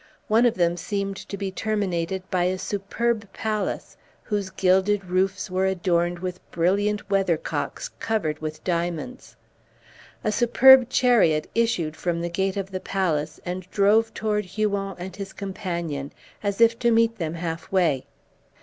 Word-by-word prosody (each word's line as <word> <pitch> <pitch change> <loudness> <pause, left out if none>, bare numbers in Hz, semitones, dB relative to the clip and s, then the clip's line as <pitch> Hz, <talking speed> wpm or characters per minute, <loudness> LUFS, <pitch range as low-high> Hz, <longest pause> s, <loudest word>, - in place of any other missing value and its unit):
One 230 +3 +5
of 235 - 0
them 175 -1 +1
seemed 195 +1 -3
to 200 - -7
be 195 -1 -3
terminated 190 -4 -2
by 180 -1 +2
a 185 +1 0
superb 205 +3 -2
palace, 215 -2 -3 0.3
whose 205 -3 -2
gilded 190 +2 +2
roofs 190 +1 0
were 190 +1 +1
adorned 175 -2 +1
with 180 0 -5
brilliant 200 +5 +1
weathercocks 195 - -1
covered 195 -10 -1
with 155 0 -6
diamonds. 175 - -3 0.9
A 215 - +1
superb 245 +3 +6
chariot 215 -14 +3
issued 205 -10 0
from 170 +1 -2
the 170 - -2
gate 190 +3 -1
of 195 0 -4
the 185 - -3
palace, 160 -6 -1
and 180 +1 -5
drove 215 +3 +3
toward 210 -1 -1
Huon 200 0 -2
and 180 +1 -7
his 195 -1 -7
companion, 170 -8 -4 0.3
as 200 0 -2
if 230 0 +5
to 235 - +3
meet 230 -1 +3
them 165 -1 -2
half 165 -1 -5
way. 165 -9 +2
190 Hz, 150 wpm, -24 LUFS, 175-210 Hz, 0.9 s, superb